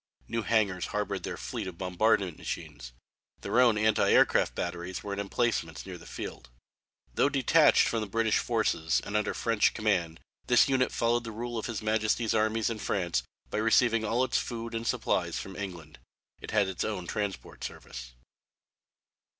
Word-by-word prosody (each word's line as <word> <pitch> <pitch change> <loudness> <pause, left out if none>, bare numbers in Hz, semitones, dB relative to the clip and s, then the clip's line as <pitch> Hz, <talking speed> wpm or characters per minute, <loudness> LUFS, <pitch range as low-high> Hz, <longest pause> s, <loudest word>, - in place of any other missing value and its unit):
New 115 - -1
hangars 105 -5 +1
harboured 105 -2 -2
their - - -5
fleet - - -5
of 90 -2 -7
bombardment 95 -1 +1
machines. - - -6 0.5
Their 120 - +1
own 120 -4 +5
anti 110 0 +3
aircraft - - +4
batteries 85 +1 -4
were 100 - -4
in 100 - -4
emplacements 100 -6 -1
near 90 -2 -8
the - - -13
field. 60 - -7 0.6
Though 140 - +3
detached 145 +3 +4
from 115 - -1
the 105 - -3
British 110 +2 +1
forces 110 -9 +1
and 105 - -5
under 105 - 0
French 115 -3 +2
command 90 -7 0 0.3
this - - +5
unit 130 -2 +2
followed 120 0 +1
the 115 - -6
rule 120 +2 -5
of 110 - -3
His 110 -3 -4
Majesty's 110 +1 +1
armies 110 +1 +1
in 110 - -4
France 85 -12 0 0.3
by - - -1
receiving 115 0 +3
all 115 +4 +1
of 130 - -2
its - - +3
food 115 -1 -5
and 115 0 -3
supplies - - 0
from 95 - -6
England. 85 -8 -7 0.4
It - - -9
had 105 -3 +2
its 95 -2 -3
own 100 -5 -3
transport 100 +1 -4
service. - - -8
110 Hz, 175 wpm, -29 LUFS, 95-115 Hz, 0.6 s, own